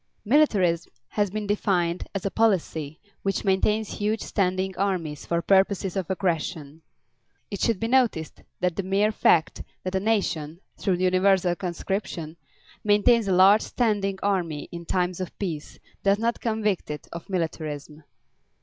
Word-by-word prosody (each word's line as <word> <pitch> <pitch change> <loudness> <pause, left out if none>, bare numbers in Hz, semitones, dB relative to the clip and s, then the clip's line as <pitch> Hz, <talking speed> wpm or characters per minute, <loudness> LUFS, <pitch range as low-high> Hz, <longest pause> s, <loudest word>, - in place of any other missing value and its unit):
Militarism 200 - +3 0.2
has 205 -2 0
been 210 +2 -4
defined 185 -4 0
as 195 - -3
"a 195 - 0
policy 165 -8 0 0.2
which 195 +1 -1
maintains 210 +2 +1
huge 210 +2 0
standing 190 -1 -1
armies 180 -6 -2
for 170 0 0
purposes 195 0 +2
of 190 -4 -2
aggression." 165 -5 -2 0.7
It 200 - -4
should 225 -5 +1
be 225 - -1
noticed 235 -11 +1 0.2
that 180 -2 +1
the - - -1
mere 195 +3 +1
fact 165 -6 +2 0.2
that 185 - -3
a 190 - +2
nation, 175 -7 -1 0.2
through 190 -3 0
universal 185 0 +3
conscription, 175 -2 -4 0.5
maintains 210 +2 +4
a - - +1
large 195 +4 +7
standing 205 -5 0
army 175 -7 -1
in 170 0 -7
times 180 -1 0
of 185 - -6
peace 165 -7 -5 0.2
does 200 0 +3
not 230 +2 -1
convict 215 -4 -1
it 150 0 -6
of 170 +2 -8
militarism. 155 -4 -4
190 Hz, 145 wpm, -25 LUFS, 170-205 Hz, 0.7 s, large